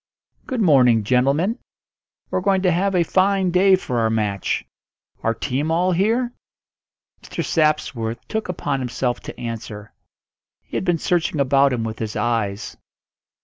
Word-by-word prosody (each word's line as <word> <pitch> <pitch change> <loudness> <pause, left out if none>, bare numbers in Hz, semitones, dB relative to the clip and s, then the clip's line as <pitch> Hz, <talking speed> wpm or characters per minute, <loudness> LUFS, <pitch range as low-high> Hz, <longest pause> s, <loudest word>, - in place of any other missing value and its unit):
"Good 255 -3 -2
morning, 125 - +5
gentlemen. 140 - +1 0.7
We're - - 0
going 190 0 +1
to 180 - +4
have 190 +3 +1
a 175 - +4
fine 190 +1 +2
day 190 +2 +5
for 125 -10 -3
our 110 -1 +2
match. 105 -3 -1 0.6
Our 115 0 0
team 145 +5 -2
all 175 +3 +2
here?" 225 +7 +1 0.9
Mr. - - -5
Sapworth 135 -8 0
took 220 -3 -3
upon 145 -6 -2
himself 125 -1 -2
to - - -10
answer; 110 -3 -7 0.7
he - - -10
had - - -1
been 175 -2 +2
searching 165 -2 0
about 140 0 +4
him 120 -3 -1
with 110 -1 -5
his 110 -2 -4
eyes. 110 -3 -2
140 Hz, 145 wpm, -21 LUFS, 115-185 Hz, 0.9 s, morning